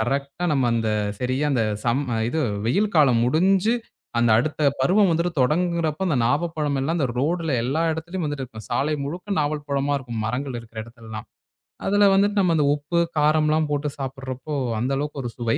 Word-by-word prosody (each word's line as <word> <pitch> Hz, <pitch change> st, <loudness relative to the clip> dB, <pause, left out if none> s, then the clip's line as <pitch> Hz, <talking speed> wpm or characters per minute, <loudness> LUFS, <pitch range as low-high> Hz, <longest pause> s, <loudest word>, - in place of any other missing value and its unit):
கரெக்டா 140 Hz, +6 st, -2 dB
நம்ம 135 Hz, -3 st, +2 dB
அந்தச் 105 Hz, -3 st, 0 dB
சரியா 130 Hz, +4 st, 0 dB
அந்தச் 110 Hz, -6 st, 0 dB
சம் 120 Hz, +4 st, +1 dB, 0.3 s
இது 160 Hz, -, -1 dB, 0.3 s
வெயில் 200 Hz, -, +1 dB
காலம் 130 Hz, -7 st, +5 dB
முடிஞ்சு 190 Hz, -, +3 dB, 0.4 s
அந்த 120 Hz, -1 st, +3 dB
அடுத்த 155 Hz, +5 st, -1 dB, 0.2 s
பருவம் 190 Hz, +9 st, +4 dB
வந்துட்டு 170 Hz, +2 st, +1 dB
தொடங்குறப்போ, 165 Hz, +3 st, +1 dB
அந்த 155 Hz, -, +1 dB
நாவல் 150 Hz, +8 st, +1 dB
பழம் 145 Hz, -2 st, 0 dB
எல்லாம் 160 Hz, +5 st, 0 dB
அந்த 140 Hz, -, +2 dB
ரோட்ல 160 Hz, +3 st, 0 dB
எல்லா 135 Hz, +7 st, 0 dB
இடத்துலயும் 175 Hz, +3 st, -4 dB
வந்துட்டு 145 Hz, -3 st, -3 dB
இருக்கும். 110 Hz, -4 st, -11 dB
சாலை 145 Hz, +5 st, +1 dB
முழுக்க 180 Hz, +8 st, -5 dB
நாவல் 150 Hz, 0 st, -1 dB
பழமா 140 Hz, 0 st, 0 dB
இருக்கும். 120 Hz, -4 st, -6 dB
மரங்கள் 125 Hz, +3 st, -3 dB
இருக்கிற 115 Hz, -1 st, -11 dB
இடத்துல 115 Hz, -1 st, -15 dB
எல்லாம். 110 Hz, -1 st, -6 dB, 0.6 s
அதுல 205 Hz, +1 st, +5 dB
வந்துட்டு 200 Hz, +1 st, +3 dB
நம்ம 180 Hz, -3 st, +3 dB
அந்த 150 Hz, -, +3 dB
உப்பு, 150 Hz, +4 st, -1 dB, 0.2 s
காரம் 155 Hz, +1 st, +3 dB
எல்லாம் 155 Hz, 0 st, +2 dB
போட்டுச் 145 Hz, 0 st, -2 dB
சாப்பிடுறப்போ 135 Hz, +1 st, -5 dB, 0.2 s
அந்த 125 Hz, +4 st, -1 dB
அளவுக்கு 145 Hz, 0 st, -3 dB
ஒரு 120 Hz, -, -3 dB
சுவை. 115 Hz, -2 st, 0 dB
145 Hz, 180 wpm, -23 LUFS, 125-160 Hz, 0.6 s, காலம்